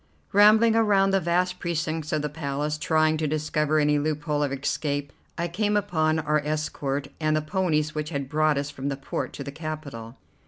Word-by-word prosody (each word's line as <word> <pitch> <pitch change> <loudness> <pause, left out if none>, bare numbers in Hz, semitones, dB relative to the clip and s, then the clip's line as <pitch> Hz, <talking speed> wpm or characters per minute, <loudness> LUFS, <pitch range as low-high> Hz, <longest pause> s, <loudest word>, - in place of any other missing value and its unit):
Rambling 215 +3 +6
around 200 -3 +4
the 195 - +3
vast 180 +1 0
precincts 160 -2 -2
of 155 -1 0
the - - 0
Palace, 150 0 -3
trying 155 0 +2
to 155 0 -1
discover 155 0 0
any 150 -1 +3
loophole 150 0 -1
of 145 -2 0
escape, 140 +1 -2 0.2
I 170 0 -1
came 210 +4 0
upon 160 -6 +1
our 150 -1 +1
escort 145 -2 -2
and 155 -1 +1
the 155 - +1
ponies 155 -3 0
which 155 0 -3
had 140 -4 -3
brought 155 +1 +2
us 140 +1 -2
from 140 0 -4
the 140 - -3
port 135 - -4
to 140 - -6
the 140 - -6
capital. 145 -7 -7
155 Hz, 190 wpm, -25 LUFS, 145-170 Hz, 0.2 s, Rambling